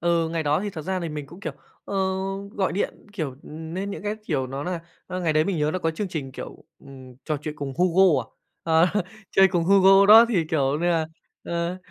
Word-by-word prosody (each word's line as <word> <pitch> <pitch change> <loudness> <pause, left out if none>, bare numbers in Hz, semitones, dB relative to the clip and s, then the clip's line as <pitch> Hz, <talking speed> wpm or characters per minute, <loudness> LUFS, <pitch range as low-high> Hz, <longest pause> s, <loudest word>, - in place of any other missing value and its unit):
Ừ, 170 -1 +1
ngày 165 -1 -2
đó 150 +2 +1
thì 205 0 -3
thật 160 -4 -7
ra 185 +3 -2
thì 170 - -3
mình 150 -2 -6
cũng, 175 +6 -13
kiểu, - - -4 0.3
ờ, - - -6 0.6
gọi 190 -2 -1
điện, 200 - -3
kiểu, 155 -8 -3
ừm, 160 +2 -8
nên 195 +2 -3
những - - -6
cái, 210 +1 -2
kiểu, 135 -5 -1
nó 135 +2 -5
là 180 -1 -3 0.3
ơ, 185 0 -4
ngày 165 -3 +1
đấy 155 0 +3
mình 180 -2 -1
nhớ 150 0 +1
nó 185 - -1
có 165 -2 0
chương 195 +5 -4
trình, 140 -6 -5
kiểu, 140 - -9
ừm, 130 -2 -13
trò 155 - -1
chuyện 155 -1 -5
cùng 140 -2 -5
Hugo 180 -5 +4
à? 115 - -15 0.4
Ờ, 165 +1 +4 0.4
chơi 195 0 +5
cùng 175 -2 0
Hugo 195 +1 +6
đó 220 +2 +10
thì, 185 -8 +1
kiểu 140 -4 +1
như 150 - -1
nà, 165 -2 +1 0.4
ờ, 170 +1 -2
165 Hz, 235 wpm, -24 LUFS, 150-185 Hz, 0.6 s, đó